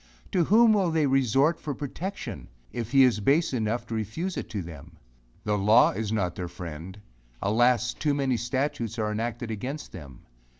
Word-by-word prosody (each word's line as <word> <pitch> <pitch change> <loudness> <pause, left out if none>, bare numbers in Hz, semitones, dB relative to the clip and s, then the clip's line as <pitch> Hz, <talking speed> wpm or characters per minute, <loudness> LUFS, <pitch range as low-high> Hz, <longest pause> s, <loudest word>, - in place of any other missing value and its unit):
To 175 -3 +2
whom 225 +4 +6
will 195 -4 +2
they 160 -2 +2
resort 135 +4 +2
for 145 -3 -4
protection, 175 +9 -6 0.2
if 115 -2 -4
he 135 -1 +6
is 125 -4 +3
base 140 +9 +2
enough 115 0 -1
to 115 - -7
refuse 115 - -3
it - - -5
to 105 -5 -4
them? 80 0 -11 0.5
The 105 -1 0
law 105 +5 +5
is 105 +1 -3
not 95 -6 0
their 90 0 -5
friend; 85 +2 -8 0.4
alas! 120 - +2
too 145 -2 0
many 135 -3 +1
statutes 120 -1 -2
are 105 -1 -1
enacted 115 +2 -3
against 130 +8 -5
them. 70 -8 -11
120 Hz, 175 wpm, -27 LUFS, 105-140 Hz, 0.5 s, whom